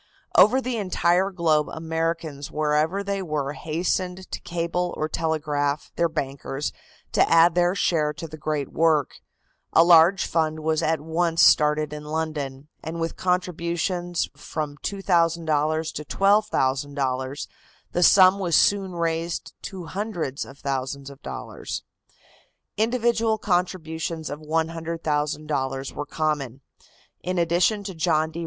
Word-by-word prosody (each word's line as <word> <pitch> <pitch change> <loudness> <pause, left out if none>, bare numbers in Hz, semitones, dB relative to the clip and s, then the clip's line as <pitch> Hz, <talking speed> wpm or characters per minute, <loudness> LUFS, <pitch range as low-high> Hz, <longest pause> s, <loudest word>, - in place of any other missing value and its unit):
Over 255 +6 +6
the 250 -2 -2
entire 185 -2 +2
globe 165 -5 +1
Americans 160 -2 -3
wherever 155 +5 0
they 200 -1 -2
were 150 -5 -2
hastened 180 +4 -2
to - - -5
cable 175 +1 -2
or 155 - -1
telegraph 150 -3 -1
their 170 - +2
bankers 140 -2 -4 0.4
to - - +3
add 165 +1 +6
their 175 +1 +2
share 155 -5 +1
to 160 +2 -7
the 155 - -9
great 150 -2 -2
work. 160 -4 +1 0.5
A 165 - +7
large 170 +2 +6
fund 155 -1 0
was 155 0 +1
at 160 -1 0
once 165 +1 +1
started 150 0 +4
in 150 0 -6
London, 150 -3 -4 0.2
and 165 +1 -5
with 165 0 -2
contributions 175 -1 -1
of - - -21
from 150 -2 -4
$2,000 165 -4 0
to 150 - -5
$12,000 140 -8 0 0.4
the 175 - 0
sum 185 +2 +7
was 175 -4 +1
soon 195 -2 +3
raised 165 0 -2
to 185 -3 -7
hundreds 175 -8 -3
of 135 - -13
thousands 140 0 -3
of 140 - -15
dollars. - - -6 0.9
Individual 225 0 +1
contributions 165 -5 -2
of 145 - -5
$100,000 155 -4 -2
were 145 - -4
common. 145 -5 -2 0.6
In 185 0 -2
addition 175 +5 +2
to 195 -1 -5
John 160 -1 +1
D. 165 - -6
160 Hz, 130 wpm, -24 LUFS, 150-175 Hz, 0.9 s, A